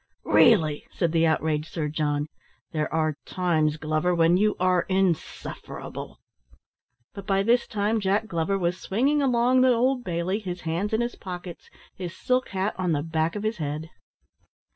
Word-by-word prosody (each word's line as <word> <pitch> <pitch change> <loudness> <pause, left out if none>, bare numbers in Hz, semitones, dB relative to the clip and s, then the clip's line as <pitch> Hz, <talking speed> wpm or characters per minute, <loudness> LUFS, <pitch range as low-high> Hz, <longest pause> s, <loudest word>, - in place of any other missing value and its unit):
"Really!" 160 -11 +4
said 170 -3 -1
the 165 0 +3
outraged 155 -1 0
Sir 155 -3 -2
John. 150 -1 -1 0.5
"There 155 -2 -2
are 155 -2 0
times, 160 -4 0
Glover, 155 +3 0
when 165 +1 +4
you 210 +3 +2
are 185 -1 +2
insufferable!" 190 -3 -3 1.0
But 200 - -9
by 195 -1 +2
this 235 +3 +2
time 215 +2 0
Jack 205 +2 +1
Glover 170 +1 -1
was 180 0 -1
swinging 275 +9 +1
along 255 -1 +3
the 260 - +5
Old 250 +2 +1
Bailey, 180 +1 -1
his 180 -4 -6
hands 170 +6 -2
in 220 +1 +1
his 240 0 -2
pockets, 180 -2 -8 0.2
his 175 -2 -7
silk 255 0 0
hat 195 +2 -1
on 180 -3 +1
the 145 -1 0
back 160 0 -1
of 210 - -4
his 215 +1 -1
head. 155 +1 -4
180 Hz, 165 wpm, -25 LUFS, 160-210 Hz, 1.0 s, the